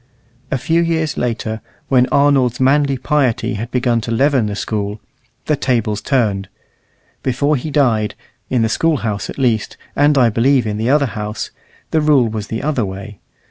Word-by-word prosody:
A -, -, 0 dB
few 165 Hz, +7 st, +1 dB
years 160 Hz, -3 st, 0 dB
later, 115 Hz, -2 st, -2 dB, 0.3 s
when 125 Hz, -2 st, +4 dB
Arnold's 135 Hz, -4 st, +3 dB
manly 140 Hz, +1 st, +3 dB
piety 130 Hz, -2 st, 0 dB
had 110 Hz, +3 st, -4 dB
begun 120 Hz, -2 st, +1 dB
to 115 Hz, -, -6 dB
leaven 130 Hz, -1 st, +2 dB
the 105 Hz, -, -3 dB
School, 105 Hz, 0 st, -3 dB, 0.5 s
the 150 Hz, -, +2 dB
tables 115 Hz, -6 st, 0 dB
turned; 105 Hz, -8 st, 0 dB, 0.7 s
before 140 Hz, +3 st, +1 dB
he 145 Hz, +4 st, -4 dB
died, 115 Hz, -8 st, +1 dB, 0.3 s
in 125 Hz, -3 st, +2 dB
the -, -, +2 dB
School 160 Hz, +7 st, +1 dB
house 105 Hz, -2 st, -2 dB
at -, -, -7 dB
least, 120 Hz, -6 st, 0 dB, 0.2 s
and 145 Hz, 0 st, +3 dB
I 120 Hz, -3 st, +4 dB
believe 125 Hz, +2 st, +3 dB
in 105 Hz, -1 st, -2 dB
the 115 Hz, +3 st, -1 dB
other 145 Hz, +1 st, +4 dB
house, 105 Hz, -3 st, -5 dB, 0.4 s
the 160 Hz, -, +2 dB
rule 145 Hz, -5 st, +4 dB
was 110 Hz, -2 st, -4 dB
the 115 Hz, +3 st, -4 dB
other 145 Hz, -5 st, 0 dB
way. 100 Hz, +1 st, -7 dB
125 Hz, 175 wpm, -18 LUFS, 110-140 Hz, 0.7 s, when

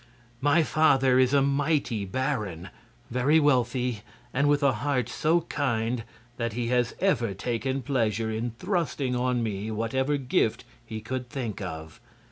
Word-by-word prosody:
"My 145 Hz, +4 st, +4 dB
father 135 Hz, -5 st, +4 dB
is 130 Hz, -1 st, +4 dB
a 140 Hz, -1 st, +4 dB
mighty 140 Hz, -6 st, 0 dB
baron, 105 Hz, -, -2 dB, 0.4 s
very 130 Hz, +6 st, +3 dB
wealthy 125 Hz, -5 st, +1 dB, 0.3 s
and 140 Hz, +2 st, +2 dB
with 145 Hz, 0 st, +2 dB
a 140 Hz, -, +5 dB
heart 125 Hz, +1 st, -1 dB
so 160 Hz, +6 st, +1 dB
kind 120 Hz, -6 st, -1 dB, 0.3 s
that 115 Hz, -2 st, -2 dB
he 120 Hz, 0 st, -2 dB
has 125 Hz, -1 st, +1 dB
ever 120 Hz, -, +1 dB
taken 125 Hz, +6 st, -2 dB
pleasure 115 Hz, -4 st, 0 dB
in 110 Hz, +2 st, -2 dB
thrusting 160 Hz, -, -1 dB
on 125 Hz, -1 st, 0 dB
me 105 Hz, -1 st, -3 dB
whatever 130 Hz, +6 st, 0 dB
gift 125 Hz, -4 st, 0 dB, 0.2 s
he 110 Hz, -2 st, -6 dB
could 125 Hz, +2 st, -4 dB
think 125 Hz, -9 st, -4 dB
of. 80 Hz, -4 st, -7 dB
125 Hz, 145 wpm, -27 LUFS, 115-140 Hz, 0.4 s, a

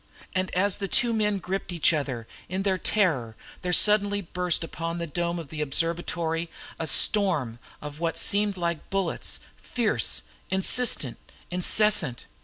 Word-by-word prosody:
And 185 Hz, 0 st, -1 dB
as 190 Hz, +1 st, +1 dB
the 200 Hz, -, -3 dB
two 235 Hz, +4 st, +2 dB
men 210 Hz, -2 st, +1 dB
gripped 190 Hz, +1 st, -4 dB
each 170 Hz, -1 st, +2 dB
other 130 Hz, -7 st, -3 dB, 0.2 s
in 190 Hz, +2 st, -2 dB
their 190 Hz, -2 st, 0 dB
terror 145 Hz, -, 0 dB, 0.3 s
there 180 Hz, -, -2 dB
suddenly 205 Hz, +1 st, +4 dB
burst 180 Hz, -2 st, -1 dB
upon 165 Hz, +1 st, -5 dB
the 170 Hz, -, -3 dB
dome 170 Hz, +2 st, -2 dB
of 165 Hz, -4 st, -7 dB
the 155 Hz, -1 st, -5 dB
observatory 165 Hz, +2 st, -2 dB, 0.3 s
a 160 Hz, -, -3 dB
storm 155 Hz, -, +4 dB, 0.2 s
of 150 Hz, 0 st, -8 dB
what 165 Hz, -1 st, -2 dB
seemed 205 Hz, 0 st, +2 dB
to 175 Hz, -2 st, -1 dB
be 170 Hz, -2 st, -2 dB
bullets 195 Hz, -3 st, -2 dB, 0.2 s
fierce, 235 Hz, -3 st, 0 dB, 0.3 s
insistent, 190 Hz, -, +2 dB, 0.3 s
incessant. 180 Hz, -, +2 dB
175 Hz, 150 wpm, -26 LUFS, 160-200 Hz, 0.3 s, suddenly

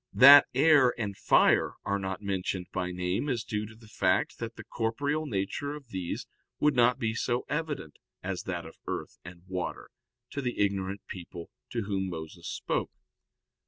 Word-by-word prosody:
That 140 Hz, +2 st, +10 dB
air 140 Hz, -3 st, +5 dB
and 105 Hz, -3 st, -2 dB
fire -, -, +4 dB
are 100 Hz, 0 st, 0 dB
not 95 Hz, +1 st, -4 dB
mentioned 95 Hz, -2 st, -2 dB
by 90 Hz, -1 st, -2 dB
name 90 Hz, +9 st, -1 dB
is 120 Hz, -5 st, -1 dB
due 105 Hz, 0 st, -3 dB
to 110 Hz, -, -13 dB
the 110 Hz, 0 st, -17 dB
fact 95 Hz, -3 st, +1 dB
that 115 Hz, 0 st, -5 dB
the -, -, -9 dB
corporeal 140 Hz, +7 st, -1 dB
nature 120 Hz, +6 st, -2 dB
of 140 Hz, -5 st, -12 dB
these 95 Hz, -4 st, -4 dB, 0.3 s
would 150 Hz, -2 st, +3 dB
not 120 Hz, 0 st, +4 dB
be 110 Hz, -1 st, -1 dB
so 120 Hz, +2 st, -1 dB
evident 150 Hz, -, -3 dB, 0.2 s
as -, -, -3 dB
that -, -, -3 dB
of -, -, -12 dB
earth -, -, -5 dB
and 85 Hz, 0 st, -11 dB
water, 90 Hz, -2 st, -4 dB, 0.4 s
to 140 Hz, -, -3 dB
the 125 Hz, -2 st, -3 dB
ignorant 100 Hz, -1 st, -1 dB
people 85 Hz, -2 st, -8 dB, 0.2 s
to 115 Hz, -2 st, -2 dB
whom 95 Hz, -2 st, -2 dB
Moses 80 Hz, -2 st, -7 dB
spoke. -, -, -2 dB
105 Hz, 170 wpm, -29 LUFS, 95-130 Hz, 0.4 s, That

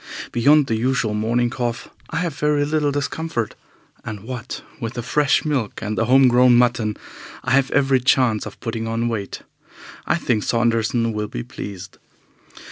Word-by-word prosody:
Beyond 145 Hz, +5 st, +4 dB
the 115 Hz, -, -1 dB
usual 120 Hz, -1 st, 0 dB
morning 120 Hz, +3 st, 0 dB
cough 120 Hz, -2 st, -3 dB, 0.2 s
I -, -, -6 dB
have 170 Hz, -4 st, -2 dB
very 145 Hz, 0 st, +1 dB
little 150 Hz, -1 st, +1 dB
discomfort, 145 Hz, -4 st, -2 dB, 0.5 s
and, 110 Hz, -3 st, -6 dB
what 120 Hz, +3 st, -7 dB, 0.2 s
with 115 Hz, -1 st, -5 dB
the 120 Hz, -, -4 dB
fresh 145 Hz, +4 st, +2 dB
milk 135 Hz, -8 st, -1 dB
and 110 Hz, 0 st, -2 dB
the 115 Hz, -, +1 dB
home 130 Hz, +2 st, +6 dB
grown 125 Hz, 0 st, +5 dB
mutton, 120 Hz, -3 st, +1 dB, 0.5 s
I 130 Hz, -, -2 dB
have 135 Hz, 0 st, +3 dB
every 135 Hz, -2 st, +3 dB
chance 125 Hz, -3 st, +2 dB
of -, -, -11 dB
putting 115 Hz, -2 st, -3 dB
on 115 Hz, +1 st, -1 dB
weight. 105 Hz, -4 st, -5 dB, 0.6 s
I -, -, +3 dB
think 120 Hz, -10 st, 0 dB
Saunderson 115 Hz, 0 st, +1 dB
will 105 Hz, 0 st, -2 dB
be -, -, -5 dB
pleased. 95 Hz, -2 st, -9 dB
120 Hz, 165 wpm, -21 LUFS, 115-135 Hz, 0.6 s, home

